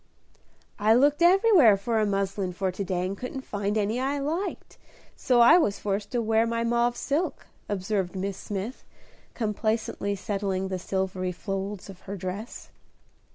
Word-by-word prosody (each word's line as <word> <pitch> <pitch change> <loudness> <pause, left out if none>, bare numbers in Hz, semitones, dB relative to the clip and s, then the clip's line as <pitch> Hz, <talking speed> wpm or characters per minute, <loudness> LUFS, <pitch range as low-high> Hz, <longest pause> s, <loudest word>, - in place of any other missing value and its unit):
"I 215 +2 +5
looked 290 +5 +3
everywhere 350 - +6
for 220 +3 -1
a 215 - +2
muslin 195 -2 -1
for 190 +1 -1
to 190 +2 -4
day 180 -1 -1
and 190 +2 -3
couldn't 250 +5 -6
find 205 -1 -2
any 215 +3 0
I 275 +2 0
liked, 320 +8 -4 0.4
so 245 -2 +3
I 240 +9 +8
was 205 - +1
forced 205 0 -2
to 240 -1 +1
wear 225 +1 +2
my 230 0 -1
mauve 235 +1 +1
silk," 305 +6 -2 0.2
observed 195 -1 -2
Miss 195 +1 -2
Smith, 205 +5 -5 0.5
complacently 215 -2 -1
settling 195 -1 -2
the 185 -1 -3
silvery 185 0 -2
folds 195 +1 -5
of 195 -2 -11
her 200 - -4
dress. 190 +5 -6
205 Hz, 155 wpm, -26 LUFS, 195-240 Hz, 0.5 s, I